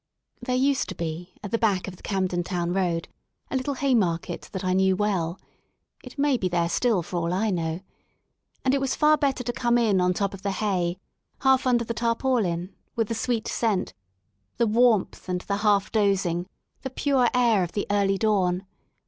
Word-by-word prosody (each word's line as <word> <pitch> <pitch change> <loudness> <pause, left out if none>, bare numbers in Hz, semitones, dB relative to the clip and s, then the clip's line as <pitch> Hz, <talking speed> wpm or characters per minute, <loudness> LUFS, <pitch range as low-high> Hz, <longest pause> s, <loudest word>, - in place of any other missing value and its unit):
There 250 +1 -1
used 270 +1 +1
to - - -5
be 170 +2 -5
at 205 - -6
the 230 - +1
back 200 -5 +1
of 185 - -7
the - - -19
Camden 185 -3 -1
Town 175 -1 -2
Road 175 -3 0 0.4
a - - -2
little 265 +2 -1
hay 275 0 +1
market 175 -8 -1
that 190 -1 -5
I 185 - +1
knew 190 0 +3
well^it 190 - -5
may 280 -2 +2
be 185 -5 -1
there 170 -1 +1
still 215 -2 +1
for 175 - -5
all 170 0 -1
I 205 +4 +1
know 165 -1 -2 0.4
— - - -45
and 260 - +3
it 275 - +1
was 270 - 0
far 305 0 +5
better 275 -3 0
to 240 0 -3
come 240 0 +2
in 210 -6 +3
on 180 0 +2
top 200 0 -1
of 195 - -9
the 200 0 -1
hay, 185 -4 -1 0.4
half 265 -1 +3
under 240 -2 +2
the 230 - -3
tarpaulin, 230 -7 0 0.2
with 225 -2 0
the - - 0
sweet 230 0 -1
scent, 220 -5 0 0.6
the 235 - +3
warmth 225 -4 +2
and 180 0 -1
the 200 +1 -2
half 205 -1 +2
dozing, 195 -5 +1 0.3
the 265 - -4
pure 260 -2 +2
air 235 -5 +4
of 175 - -5
the 205 - -1
early 200 -1 +2
dawn. 190 -3 +1
200 Hz, 200 wpm, -25 LUFS, 180-240 Hz, 0.6 s, far